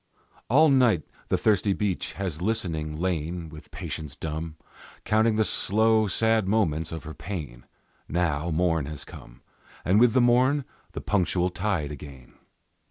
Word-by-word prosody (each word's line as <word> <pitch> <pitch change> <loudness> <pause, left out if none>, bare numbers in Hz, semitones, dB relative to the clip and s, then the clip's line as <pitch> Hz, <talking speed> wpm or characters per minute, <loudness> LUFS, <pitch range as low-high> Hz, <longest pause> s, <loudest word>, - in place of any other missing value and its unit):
All 155 +6 +6
night 125 - +4 0.3
the - - +2
thirsty 105 -2 +2
beach 100 -3 -2
has 90 -5 -4
listening 80 -7 -2
lain, 85 -1 -2
With 75 -1 -12
patience 75 -3 -6
dumb, 80 +2 -5 0.5
Counting 110 +1 +3
the 110 - +3
slow, 110 +1 +2
sad 110 0 +2
moments 80 -7 +1
of 80 - -6
her 80 0 -7
pain; 75 -13 -7 0.4
Now 85 -1 0
morn 80 -3 +1
has 75 -2 -6
come, - - -13 0.4
And 95 +4 +4
with 120 -1 +5
the - - +4
morn 130 +4 +3 0.3
the - - -5
punctual 90 -2 +1
tide 90 -6 -1
again. 70 -3 -11
90 Hz, 145 wpm, -26 LUFS, 80-110 Hz, 0.5 s, All